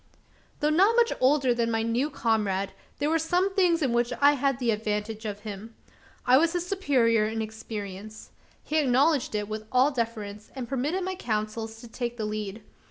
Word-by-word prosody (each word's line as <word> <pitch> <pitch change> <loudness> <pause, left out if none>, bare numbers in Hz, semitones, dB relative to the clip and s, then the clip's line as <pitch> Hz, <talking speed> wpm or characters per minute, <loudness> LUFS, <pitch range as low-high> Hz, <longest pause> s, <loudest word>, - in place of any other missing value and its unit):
Though 300 +1 +3
not 390 +8 +4
much 475 -1 +4
older 260 -1 +3
than 235 -1 0
my 225 -1 0
new 235 +6 0
comrade, 210 -7 0 0.3
there 290 - 0
were 325 - +3
some 360 +4 +1
things 350 -4 +3
in 255 -4 +1
which 240 +1 +1
I 285 +1 +7
had 275 -2 0
the 245 -3 +1
advantage 215 0 -3
of 205 -1 -4
him. 215 +1 -8 0.5
I 255 +1 +6
was 330 +4 +3
his 350 -1 -1
superior 250 - +2
in 225 +1 -3
experience. 215 -1 -7 0.3
He 310 - -1
acknowledged 275 -1 +2
it 210 -1 -1
with 215 0 -6
all 260 +3 +4
deference, 220 -4 -4
and 255 -3 -5
permitted 285 +9 -1
my 375 +1 -2
counsels 220 -5 -3
to 240 - -10
take 240 +1 -4
the 220 - -2
lead. 210 0 -4
235 Hz, 185 wpm, -27 LUFS, 215-290 Hz, 0.5 s, I